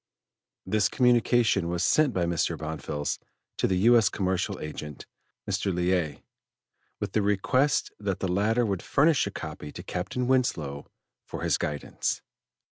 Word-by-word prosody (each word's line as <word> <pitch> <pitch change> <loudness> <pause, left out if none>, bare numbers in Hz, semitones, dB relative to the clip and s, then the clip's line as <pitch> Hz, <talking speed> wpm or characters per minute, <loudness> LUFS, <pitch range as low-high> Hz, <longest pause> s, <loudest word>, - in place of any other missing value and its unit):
This 105 +1 +2
communication 120 -6 +3
was 85 0 -1
sent 155 -3 +4
by 90 -5 0
Mr. 85 -2 0
Bonfils 75 -2 -3 0.4
to - - +3
the 95 - +1
U. 120 +1 +7
S. 115 -5 +5
Commercial 95 -2 -1
Agent, 75 -1 -7 0.4
Mr. 100 - 0
Liais, 90 -4 0 0.8
with - - -4
a 110 - +4
request 130 +8 +1
that 100 -3 -2
the 95 - -1
latter 105 +6 +2
would 100 -4 -1
furnish 150 0 +3
a - - -4
copy 75 - -7
to - - -9
Captain 100 +8 -3
Winslow 90 - 0 0.4
for - - -7
his - - +1
guidance. 75 -1 -2
95 Hz, 145 wpm, -27 LUFS, 85-120 Hz, 0.8 s, U